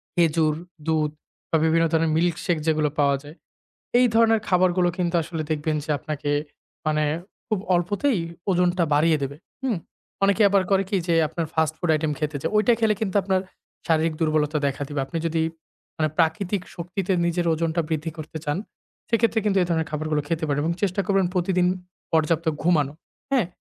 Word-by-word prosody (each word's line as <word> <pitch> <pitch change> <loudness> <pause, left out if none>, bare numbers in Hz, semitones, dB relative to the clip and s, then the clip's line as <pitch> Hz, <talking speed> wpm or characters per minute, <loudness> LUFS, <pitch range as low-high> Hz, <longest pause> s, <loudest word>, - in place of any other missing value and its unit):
খেজুর, 160 -3 +3 0.3
দুধ 155 -2 +1 0.4
বা 160 - +3
বিভিন্ন 165 +1 +3
ধরনের 160 -1 +2
মিল্কশেক 175 +1 +1
যেগুলো 155 -1 +2
পাওয়া 140 -1 +4
যায়। 150 +3 -11 0.6
এই 250 - +6
ধরনের 225 -1 +4
খাবারগুলো 180 -1 +3
কিন্তু 175 -1 0
আসলে 165 -1 -4
দেখবেন 155 0 0
যে - - -15
আপনাকে 145 0 -4 0.6
মানে 155 0 +2 0.4
খুব 215 -4 0 0.2
অল্পতেই 205 +7 +1 0.3
ওজনটা 180 -1 +2
বাড়িয়ে 155 +1 +4
দেবে। 140 +2 -4 0.3
হুম। 245 -7 0 0.5
অনেকে 200 +2 +3
আবার 195 -1 +3
করে 195 0 +4
কি 200 - +1
যে 170 - +3
আপনার 165 +2 -3
ফাস্ট 160 -1 +1
ফুড 175 - -2
আইটেম 155 0 0
খেতে 150 -2 -2
চায়। - - -2
ঐটা 230 +3 +4
খেলে 220 -2 +3
কিন্তু 195 -3 -2
আপনার 190 -1 +1 0.5
শারীরিক 160 0 +2
দুর্বলতা 155 -1 +1
দেখা 140 +1 -3
দিবে। 145 -2 -4
আপনি 150 +5 -4
যদি 165 0 0 0.6
মানে 155 -1 +1
প্রাকৃতিক 180 +4 +1
শক্তিতে 180 +2 -3
নিজের 170 0 0
ওজনটা 165 +1 0
বৃদ্ধি 160 0 -2
করতে 155 +1 -7
চান, 145 +2 0 0.5
সেক্ষেত্রে 230 0 +2
কিন্তু 200 -2 +2
এ - - -1
ধরনের 160 -2 0
খাবারগুলো 150 0 -1
খেতে 165 0 -2
পারেন 145 -1 0
এবং 170 +2 +1
চেষ্টা 200 0 +1
করবেন 195 -2 +3
প্রতিদিন 180 0 +2 0.5
পর্যাপ্ত 160 +1 +2 0.2
ঘুমানো। 150 -5 +2 0.4
হ্যাঁ? 250 -10 +3
165 Hz, 170 wpm, -24 LUFS, 155-185 Hz, 0.6 s, এই